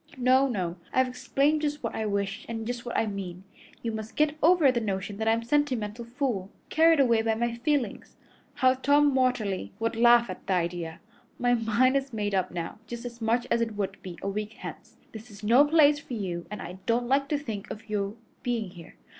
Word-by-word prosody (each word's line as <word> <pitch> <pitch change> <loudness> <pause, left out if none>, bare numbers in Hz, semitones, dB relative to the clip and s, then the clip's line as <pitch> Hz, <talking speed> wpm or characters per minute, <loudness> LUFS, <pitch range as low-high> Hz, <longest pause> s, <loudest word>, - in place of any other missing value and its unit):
No, 260 +2 +4
no; 185 -8 -2
I've 260 0 +3
explained 275 +4 +1
just 295 -2 -2
what 230 - -2
I 220 - -2
wish 200 -1 -2
and 225 -1 -4
just 245 +1 -4
what 240 - -2
I - - +2
mean. 190 -3 -5 0.4
You 230 - -1
must 220 0 -6
get 305 -1 +2
over 325 -4 +6
the 245 - 0
notion 200 -1 -3
that 220 +1 -2
I'm 225 +1 +3
a - - -11
sentimental 235 -5 0
fool, 235 -6 -2 0.2
carried 325 -1 +5
away 235 -4 +4
by 225 0 +1
my 235 +1 -1
feelings. 245 -2 -2 0.4
How 255 0 +4
Tom 285 +2 +3
Watterly 235 - 0
would 230 0 -1
laugh 235 +1 +6
at - - -8
the 195 - +2
idea! 170 -1 -2 0.4
My 245 0 +2
mind 235 +3 +2
is 270 -1 -1
made 205 -2 -2
up 185 -1 +1
now 170 +3 -5
just 235 +1 -7
as 235 -1 -8
much 230 +2 +1
as 235 - +3
it 225 -2 -1
would 195 -1 -3
be 180 -2 -8
a - - -2
week 210 +2 -3
hence. - - -10
This 220 +2 -10
is 205 0 -13
no 235 +6 +6
place 295 -1 +5
for 260 -4 -7
you, 180 -5 -4
and 210 - -6
I 180 +1 -8
don't 240 +1 +2
like 275 +2 +2
to 295 - +1
think 220 -8 -6
of 220 +1 -8
your 205 -1 -2 0.3
being 230 -6 -2
here. 170 -3 -13
230 Hz, 215 wpm, -27 LUFS, 205-255 Hz, 0.4 s, over